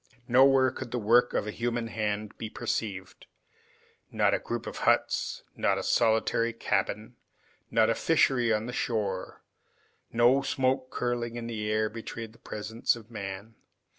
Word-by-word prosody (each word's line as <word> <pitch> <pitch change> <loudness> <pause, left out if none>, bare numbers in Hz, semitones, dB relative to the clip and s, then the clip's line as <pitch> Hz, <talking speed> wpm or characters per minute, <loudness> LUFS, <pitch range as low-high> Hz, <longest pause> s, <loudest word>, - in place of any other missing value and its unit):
Nowhere 130 +1 +5
could 130 0 -7
the 125 - -2
work 120 +2 +3
of - - +1
a 105 - -3
human 120 +1 -2
hand 105 -2 -3
be 110 - -4
perceived. 100 -3 -4 0.8
Not - - +2
a - - +2
group - - -4
of - - -6
huts, - - +1
not - - +1
a - - -3
solitary 115 +1 +2
cabin, 115 - -2 0.5
not 110 -1 +4
a 115 - +3
fishery 130 -3 +2
on 110 0 +1
the 125 - -5
shore. 105 -7 -2 0.7
No 120 +4 +4
smoke 130 -1 0
curling 120 -2 -2
in 120 -1 -5
the 110 -2 -3
air 110 0 +1
betrayed 115 0 -7
the - - -21
presence 110 +3 -1
of 115 0 -13
man. 100 0 -6
115 Hz, 155 wpm, -28 LUFS, 110-120 Hz, 0.8 s, Nowhere